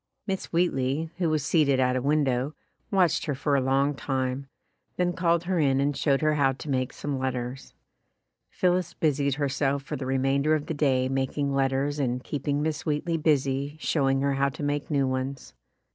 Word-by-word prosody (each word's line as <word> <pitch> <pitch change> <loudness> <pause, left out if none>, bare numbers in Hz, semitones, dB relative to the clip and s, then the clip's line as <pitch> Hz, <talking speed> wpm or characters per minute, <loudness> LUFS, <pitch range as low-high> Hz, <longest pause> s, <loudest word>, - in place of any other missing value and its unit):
Miss 190 -2 -2
Wheatley, 160 -2 0
who 170 -3 +2
was 155 -3 0
seated 145 -5 +3
at 125 0 +2
a 130 - 0
window, 140 -1 +1 0.3
watched 180 -4 +2
her 145 - 0
for 140 +2 0
a 135 - +3
long 135 +2 +2
time, 135 -1 -2 0.5
then 180 0 +1
called 170 -1 +1
her 180 -1 0
in 135 -3 +3
and 140 +1 +1
showed 140 -1 +1
her 155 0 +3
how 140 -3 +2
to 145 +3 -9
make 130 -1 0
some 145 -2 -4
letters. 130 0 -4 0.7
Phillis 180 -1 0
busied 140 -3 +1
herself 140 -1 0
for 150 - -5
the 130 -2 -5
remainder 135 +3 +2
of 150 -1 -3
the - - -3
day 135 -4 +2
making 135 +1 -1
letters 135 +2 0
and 125 -2 -1
keep 145 -1 -5
ing 145 +1 +1
Miss 155 -2 -2
Wheatley 155 +2 -1
busy 140 -2 0
showing 135 -4 +1
her 140 0 +1
how 140 0 +2
to 140 - -8
make 145 0 -1
new 140 -3 +2
ones. 130 +1 -4
140 Hz, 190 wpm, -27 LUFS, 135-155 Hz, 0.7 s, seated